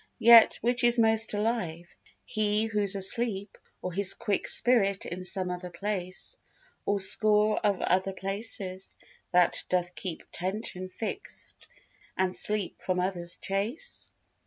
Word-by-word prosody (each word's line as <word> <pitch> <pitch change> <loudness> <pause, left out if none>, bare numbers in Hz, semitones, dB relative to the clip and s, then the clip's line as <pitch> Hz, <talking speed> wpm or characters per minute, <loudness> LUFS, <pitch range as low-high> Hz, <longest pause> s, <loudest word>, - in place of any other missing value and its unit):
Yet 235 0 +7
which 240 +1 +1
is 240 0 +7
most 225 -1 +2
alive, 200 -6 -3 0.3
he 215 -2 0
who's 210 -3 +1
asleep 200 +1 +1 0.3
Or 180 - -4
his 195 +1 +4
quick 210 -4 -2
spirit 200 -6 +3
in 180 +2 -7
some 185 0 0
other 180 0 -6
place, 190 - -5 0.5
Or 200 0 +1
score 210 +2 +3
of 205 -3 0
other 185 +2 0
places, 195 -1 -4 0.3
that 180 -1 +2
doth 180 -1 -1
keep 180 -4 -6
Attention 185 0 -5
fixed 225 - -8 0.5
and 185 -1 0
sleep 210 -4 +1
from 185 -1 -2
others 180 -2 -3
chase? 220 - -4
200 Hz, 130 wpm, -27 LUFS, 185-220 Hz, 0.5 s, Yet